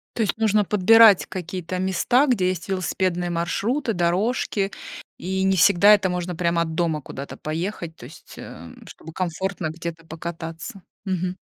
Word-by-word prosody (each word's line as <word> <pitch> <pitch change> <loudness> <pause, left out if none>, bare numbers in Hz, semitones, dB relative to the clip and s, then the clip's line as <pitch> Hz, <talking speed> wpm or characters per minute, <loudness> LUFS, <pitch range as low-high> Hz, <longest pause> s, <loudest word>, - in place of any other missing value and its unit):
То 230 - -1
есть 205 - -1
нужно 215 -2 +2
подбирать 210 +1 +6
какие-то 180 0 -5
места, 190 +8 +2
где 195 -8 +2
есть 185 -1 -4
велосипедные 185 -1 -1
маршруты, 220 - -1
дорожки, 195 +3 0 0.5
и 190 +1 -2
не 190 0 +2
всегда 200 +4 +6
это 195 -2 +2
можно 180 0 -3
прямо 170 0 0
от 160 -1 -3
дома 160 -3 0
куда-то 140 +1 -8
поехать, 165 +1 -4
то 120 - -12
есть, 140 - -14
эм, 85 +2 -11
чтобы 160 - -12
комфортно 185 0 -3
где-то 165 0 -7
покататься. 165 +5 -7 0.2
Мгм. 185 -1 -2
180 Hz, 150 wpm, -23 LUFS, 170-195 Hz, 0.5 s, подбирать